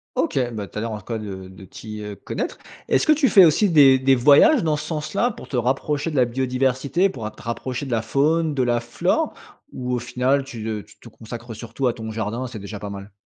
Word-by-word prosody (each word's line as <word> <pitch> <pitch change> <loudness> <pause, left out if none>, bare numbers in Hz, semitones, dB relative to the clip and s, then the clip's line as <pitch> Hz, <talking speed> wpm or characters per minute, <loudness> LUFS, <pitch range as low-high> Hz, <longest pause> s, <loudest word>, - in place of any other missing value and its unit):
OK. 315 - 0
Bah, 105 -2 -4
tu - - -11
as 105 - -1
l'air 115 - -3
en 110 - -4
tout - - -17
cas 115 - -3
de 95 -3 -7
de 95 +1 -13
t'y, 105 +3 -9
heu, 105 -1 -6
connaître. - - -5 0.3
Est-ce - - +2
que 310 - +4
tu 300 -2 +4
fais 195 -6 +7
aussi 175 +5 +4
des 140 -5 +6
des 135 0 +4
voyages, 150 - +6
dans 155 -2 +1
ce 150 - -6
sens-là, 175 +9 -1
pour - - -12
te 130 - -2
rapprocher 140 +5 0
de 155 - -6
la 130 - +5
biodiversité, 130 +7 0
pour 120 - -7
a 110 - -4
te - - -16
rapprocher 125 +3 -4
de 135 - -7
la 115 -2 +1
faune, 150 +7 +1
de 135 -2 +1
la 120 -1 +1
flore? 120 0 -1 0.4
Ou 125 0 -3
au - - -1
final, 130 +3 0
tu, 120 -5 -7
heu, 105 -2 -3
tu - - -20
te - - -13
consacres 115 +1 -9
surtout 115 +4 -3
à 120 - +1
ton 110 -1 -7
jardin 110 +3 -3
et - - -4
c'est 115 -3 -8
déjà 100 +1 -7
pas 105 - -6
mal? 100 0 -8
125 Hz, 260 wpm, -22 LUFS, 110-145 Hz, 0.4 s, fais